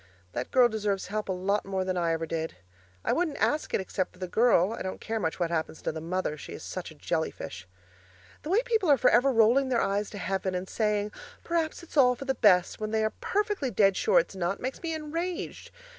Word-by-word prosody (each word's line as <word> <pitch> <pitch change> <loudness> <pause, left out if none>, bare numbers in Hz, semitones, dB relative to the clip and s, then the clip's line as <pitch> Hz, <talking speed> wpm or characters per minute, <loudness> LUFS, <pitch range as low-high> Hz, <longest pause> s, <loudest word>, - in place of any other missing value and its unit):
That 120 +4 -4
girl 250 -2 +6
deserves 210 -4 -2
help 215 0 -3
a - - +2
lot 190 +3 0
more 190 -1 -2
than 185 0 -1
I 170 -2 +1
ever 165 0 -1
did. 160 0 -3 0.5
I - - +2
wouldn't 330 -4 0
ask 300 +1 0
it - - +1
except 185 0 -2
for - - -19
the 185 0 -4
girl; 215 -1 +3
I - - -6
don't 185 - -4
care 225 0 -3
much 160 -4 -2
what 170 -1 0
happens 160 -1 -2
to - - 0
the 160 0 -6
mother 170 -2 -2
she - - -9
is - - -8
such - - -5
a - - -13
jelly - - -1
fish. 90 - -8 0.7
The 300 - -7
way 420 +7 +3
people 445 -8 +1
are 285 - +7
for 255 - +4
ever 260 +3 +5
rolling 245 +3 +4
their 245 -2 +2
eyes 200 0 0
to 205 - -8
heaven 190 -1 -2
and 180 +1 -3
saying, 210 -1 0 0.3
'Perhaps 335 0 -1
it's 325 - -9
all 250 -2 +6
for 275 - -8
the 265 - +1
best,' 185 -7 +4
when 215 0 -3
they 220 0 +1
are 215 - 0
perfectly 410 -8 0
dead 195 -3 +3
sure 455 - +3
it's - - +2
not, 185 +1 -1
makes 260 +2 -4
me 330 - -3
enraged. 330 +4 -4
210 Hz, 240 wpm, -28 LUFS, 185-275 Hz, 0.7 s, are